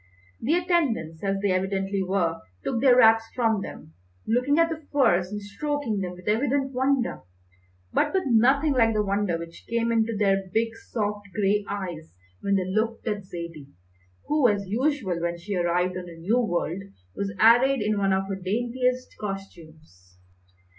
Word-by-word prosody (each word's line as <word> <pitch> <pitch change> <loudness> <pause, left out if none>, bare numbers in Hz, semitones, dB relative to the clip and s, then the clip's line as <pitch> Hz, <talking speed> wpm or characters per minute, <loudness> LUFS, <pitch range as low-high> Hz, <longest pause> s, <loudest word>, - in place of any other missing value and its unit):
The 295 +8 +2
attendants, 290 - 0
as 195 0 0
they 200 - +2
evidently 195 +1 -1
were, 180 -3 0 0.2
took 230 - -1
their 260 -3 +6
wraps 225 -2 +6
from 225 -4 +1
them, 80 - -9 0.3
looking 250 +6 +2
at 330 0 +4
the 315 -2 -6
furs 185 -10 +3
and 210 - -3
stroking 225 +2 -3
them 180 -2 -3
with 180 0 -14
evident 270 +5 +1
wonder; 260 0 0 0.7
but - - +2
with 380 -1 +1
nothing 270 +5 +4
like 225 -3 +3
the 210 - +2
wonder 200 -3 0
which 170 0 -10
came 235 0 0
into 225 -1 +1
their 195 -2 +1
big 225 +2 0
soft 205 -2 -2
grey 205 0 +2
eyes 175 - -6 0.2
when 200 0 0
they 190 -2 +1
looked 220 +5 -1
at 205 -3 -2
Zaidie, 170 -6 -8 0.5
who, 295 -4 +3
as 205 -2 0
usual 220 - -1
when 170 0 -1
she 195 +4 -5
arrived 180 +1 +1
on 180 -1 -6
a 165 - -11
new 205 +9 +1
world, 175 -4 -1 0.3
was 200 0 -2
arrayed 240 +2 +5
in 210 -1 0
one 195 -1 +2
of 190 0 +1
her 195 - -3
daintiest 250 +5 -1
costumes. 155 - -9
205 Hz, 165 wpm, -25 LUFS, 185-245 Hz, 0.7 s, their